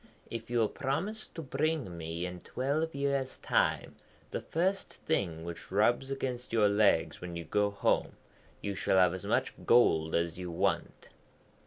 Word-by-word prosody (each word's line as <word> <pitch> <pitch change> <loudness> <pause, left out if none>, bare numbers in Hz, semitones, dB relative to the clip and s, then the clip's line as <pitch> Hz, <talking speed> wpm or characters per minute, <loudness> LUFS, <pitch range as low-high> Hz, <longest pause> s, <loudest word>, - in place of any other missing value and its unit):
'If 115 0 -5
you 120 - 0
will 115 -2 +4
promise 175 - -3
to 165 - -5
bring 140 - -1
me 85 +1 -4
in 90 0 -6
twelve 145 +5 -1
years' 140 -1 -1
time - - 0 0.3
the - - -2
first 185 +4 -1
thing 85 - -2
which 85 0 -7
rubs 120 +6 +2
against 130 -2 -3
your 110 -2 +4
legs 100 -5 +3
when 90 -1 -6
you 85 - -4
go 105 0 +2
home, 100 - +1 0.5
you 100 - -2
shall 95 - +1
have 90 -2 +5
as 95 - -6
much - - +1
gold 80 -10 +4
as 85 +1 0
you 90 -1 -4
want.' 85 - -1
110 Hz, 165 wpm, -31 LUFS, 90-135 Hz, 0.5 s, have